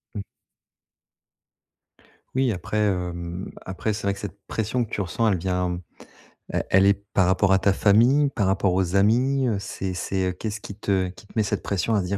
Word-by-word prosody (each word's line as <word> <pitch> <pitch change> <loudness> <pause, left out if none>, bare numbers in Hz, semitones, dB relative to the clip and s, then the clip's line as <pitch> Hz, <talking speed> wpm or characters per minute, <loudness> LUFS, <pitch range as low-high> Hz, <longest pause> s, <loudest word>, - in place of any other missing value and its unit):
Mmh. 100 - -4 2.1
Oui, 130 -4 +2
après, 90 +4 -4
hem, 90 -3 -2
après, 95 +4 -2
c'est 105 0 -4
vrai 100 0 +1
que 100 - -10
cette 100 0 -7
pression 115 +2 -1
que - - -17
tu 100 - -2
ressens 110 +5 0
elle 95 - +2
vient. 90 0 -1 0.7
Elle - - -1
elle 95 +1 +5
est 100 - +6 0.2
par 95 - +4
rapport 95 +1 +3
à 95 - +4
ta 100 - +3
famille? 120 +9 +4
Par 100 - 0
rapport 95 -1 +2
aux 95 0 0
amis? 125 +6 +3
Heu, 110 -4 +1
c'est 95 -1 -4
c'est 95 0 -2
qu'est-ce 110 -1 -4
qui 100 - -9
te 95 -3 0
qui 95 - -14
te - - -20
met 110 - +4
cette - - -2
pression, 100 +3 -1
à 100 - +2
se - - -4
dire: 100 +1 -1
100 Hz, 200 wpm, -24 LUFS, 95-110 Hz, 2.1 s, est